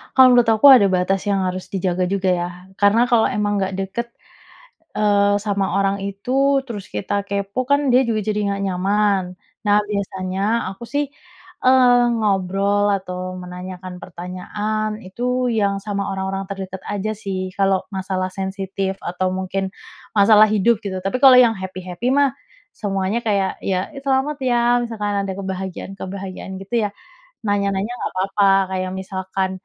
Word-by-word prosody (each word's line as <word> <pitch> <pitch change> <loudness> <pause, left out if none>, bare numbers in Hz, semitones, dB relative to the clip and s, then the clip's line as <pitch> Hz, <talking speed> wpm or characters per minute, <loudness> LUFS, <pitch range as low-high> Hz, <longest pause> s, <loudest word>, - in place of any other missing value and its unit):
Kalau 260 -1 +8
menurut 245 -1 +5
aku 220 +5 +6
ada 245 -7 +8
batas 190 +1 +1
yang 200 -1 +1
harus 185 0 -4
dijaga 185 -1 0
juga, 190 0 0
ya, 175 -1 -1 0.3
karena 210 +3 +5
kalau 235 -2 +4
emang 205 -1 0
nggak 190 0 -1
dekat, 195 +5 -3 0.9
eee, 205 -1 +3
sama 200 -3 -1
orang 195 0 +1
itu 265 +8 +1
terus 210 -6 -6
kita 200 - -3
kepo, 200 +5 -2
kan, 285 -1 +3
dia 255 +1 +4
juga 220 -2 +1
jadi 210 0 -1
nggak 200 0 -2
nyaman. 195 +1 +1 0.4
Nah, 205 0 +5
biasanya 195 +1 -1
aku, 195 +5 -10
sih, 285 +3 0 0.6
eee, 250 -1 +6
ngobrol 200 -1 +1
atau 185 -1 -5
menanyakan 180 0 -8
pertanyaan 210 +5 -4
itu 250 +5 -1
yang 200 -3 0
sama 200 -1 -3
orang-orang 195 0 -3
terdekat 190 -1 -6
aja, 205 +1 -2
sih, 190 -3 -4
kalau 195 -1 +2
masalah 185 -1 -2
sensitif 195 0 -3
atau 180 +2 -1
mungkin 190 +1 -2 0.5
masalah 210 +1 +7
hidup, 215 +2 +3
gitu, 190 -2 -4
tapi 195 +6 -1
kalau 265 -2 +8
yang 245 -2 +7
happy-happy, 185 +3 -5
mah, 285 -2 +3 0.4
semuanya 195 +1 -1
kayak, 200 -3 0
ya, 185 -1 -2
"Ih, 290 - -10
selamat, 275 +2 +1
ya." 240 0 +3
Misalkan 210 -4 -2
ada 190 - -3
kebahagiaan-kebahagiaan, 190 0 -6
gitu, 220 +2 0
ya, - - -6 0.6
nanya-nanya 200 0 0
nggak - - -4
papa, 195 +1 +2 0.2
kayak 185 0 -2
misalkan, 190 0 -3
200 Hz, 150 wpm, -20 LUFS, 190-215 Hz, 0.9 s, Kalau